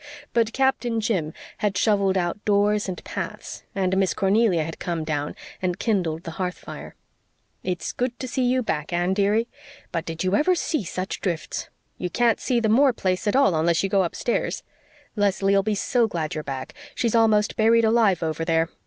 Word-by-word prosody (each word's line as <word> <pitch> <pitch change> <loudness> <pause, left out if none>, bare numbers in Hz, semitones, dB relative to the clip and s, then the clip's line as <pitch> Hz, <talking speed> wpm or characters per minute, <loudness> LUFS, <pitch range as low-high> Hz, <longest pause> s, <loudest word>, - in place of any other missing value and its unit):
But 230 -1 +2
Captain 250 -3 +1
Jim 190 -8 -1 0.3
had 205 -2 0
shovelled 200 -3 +2
out 175 +3 -2
doors 205 0 +2
and 180 - -6
paths, - - -6
and 190 -1 +1
Miss 190 -2 +2
Cornelia 195 -4 +3
had 160 +1 -7
come 170 -3 -2
down 150 -2 -2 0.3
and 180 -1 -1
kindled 175 -8 -1
the 165 - -6
hearth 180 0 -2
fire. - - -9 0.7
"It's 180 -2 -3
good 250 0 -2
to 260 - -4
see 260 - -2
you 250 +1 +2
back, 155 -6 -2
Anne, 175 +2 +1
dearie! 210 +4 +2 0.4
But 165 -1 -2
did 165 +1 -4
you 185 +2 +2
ever 360 - +3
see 315 -6 -1
such 185 +2 -4
drifts? 170 -4 -3 0.3
You 180 - -2
can't 235 +4 +2
see 250 -3 +1
the 225 - +1
Moore 260 +5 +5
place 185 -1 -1
at 205 - +2
all 275 -9 +4
unless 165 +2 +2
you 195 - 0
go 195 0 +3
upstairs. 185 +7 -2 0.5
Leslie'll 200 -1 +2
be 210 +1 -1
so 235 +3 +2
glad 160 -6 -3
you're 155 - -4
back. 135 -2 -6 0.2
She's 230 -2 0
almost 220 -2 +3
buried 225 +1 +4
alive 220 -6 +3
over 160 0 -2
there. 165 0 +1
195 Hz, 190 wpm, -24 LUFS, 175-225 Hz, 0.7 s, Moore